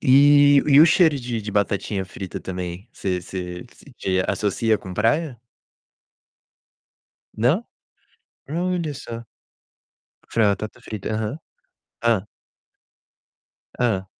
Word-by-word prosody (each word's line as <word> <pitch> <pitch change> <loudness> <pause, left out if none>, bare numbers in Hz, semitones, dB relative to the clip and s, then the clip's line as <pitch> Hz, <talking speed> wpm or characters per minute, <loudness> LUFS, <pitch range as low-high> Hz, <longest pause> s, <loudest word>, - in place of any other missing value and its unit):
E 145 +1 +6
e 145 0 +7
o 160 - +9
cheiro 160 -3 +4
de 120 -2 -3
de 105 - -5
batatinha 100 -1 -1
frita 95 0 -7
também, 90 +2 -6
você 90 -2 -2
você 90 +2 -6 0.3
você 95 -1 0
associa 110 +1 +1
com 95 -2 -9
praia? 130 - +1 2.0
Não? 140 - +2 0.8
Olha 170 -2 -1
só. 115 -4 -8 1.1
Fr 115 - 0
batata 105 +1 -1
frita, 110 -1 -6
aham. 110 +4 -2 0.7
Hã. 105 -4 +2 1.5
Hã. 105 -6 0
110 Hz, 100 wpm, -23 LUFS, 95-145 Hz, 2.0 s, o